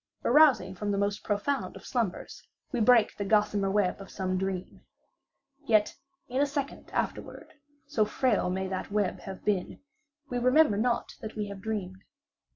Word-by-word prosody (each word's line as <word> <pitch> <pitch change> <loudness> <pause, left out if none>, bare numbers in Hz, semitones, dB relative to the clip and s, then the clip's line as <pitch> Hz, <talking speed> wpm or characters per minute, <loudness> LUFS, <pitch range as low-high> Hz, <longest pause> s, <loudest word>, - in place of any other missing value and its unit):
Arousing 260 -9 +5
from 205 +3 -4
the 200 - 0
most 200 +1 -1
profound 225 +7 -1
of - - -11
slumbers, 230 -8 -3 0.3
we 250 - -1
break 230 0 +5
the 200 - -3
gossamer 205 -1 +2
web 200 -1 +1
of 195 - -10
some 185 -1 -2
dream. 190 -1 -3 0.9
Yet 215 -2 +3 0.3
in 255 +2 0
a 290 - +3
second 280 -1 -4
afterward, - - -4 0.3
(so 215 - +1
frail 215 -3 +1
may 190 +1 -2
that 185 0 -4
web 205 -2 0
have 190 -1 -9
been) 200 -4 -1 0.5
we 245 -1 -2
remember 255 0 +4
not 235 +3 0
that 220 -1 -7
we 210 -2 -3
have 200 -1 -8
dreamed. 195 -4 -4
210 Hz, 160 wpm, -29 LUFS, 195-240 Hz, 0.9 s, Arousing